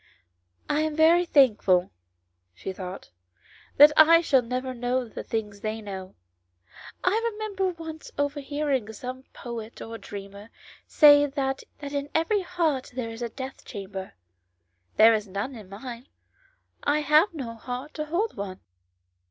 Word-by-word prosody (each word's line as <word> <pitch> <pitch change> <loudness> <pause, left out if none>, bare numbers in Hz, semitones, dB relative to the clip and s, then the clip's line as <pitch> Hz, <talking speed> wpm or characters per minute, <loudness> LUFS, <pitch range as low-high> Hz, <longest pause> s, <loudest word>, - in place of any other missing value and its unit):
" - - -47 0.3
I 295 - +1
am 310 -1 -1
very 330 +3 +5
thank 265 -9 +5
ful," 180 -1 +3 0.6
she 190 - -6
thought, 185 - -8 0.3
" - - -27
that 295 +2 +10
I 330 +2 +7
shall 275 -6 +3
never 255 +2 -3
know 245 +1 -1
the 220 - -7
things 210 -3 -4
they 215 +1 -3
know. 190 -3 -8 0.9
I 410 +5 +2
remember 415 -3 -2
once 325 -2 -8
overhearing 285 -4 -1
some 255 +3 -7
poet 230 -2 -8
or 225 0 -7
dreamer 200 +1 -9 0.4
say 290 -1 +7
that 270 -1 -2 0.2
in 285 0 -3
every 360 +6 +2
heart 335 -7 -1
there 245 -3 -3
was 225 +1 -8
a 235 - -2
death 265 +3 -8
chamber; 195 -3 -7 0.8
there 225 +1 +7
is 215 -1 -1
none 200 +8 -4
in 215 -6 -11
mine; 235 +5 -8 0.7
I 295 +1 +1
have 305 +6 +4
no 250 -6 -5
heart 250 +5 -6
to 305 - -4
hold 360 +9 -1
one." 195 -2 -6
260 Hz, 150 wpm, -26 LUFS, 220-300 Hz, 0.9 s, that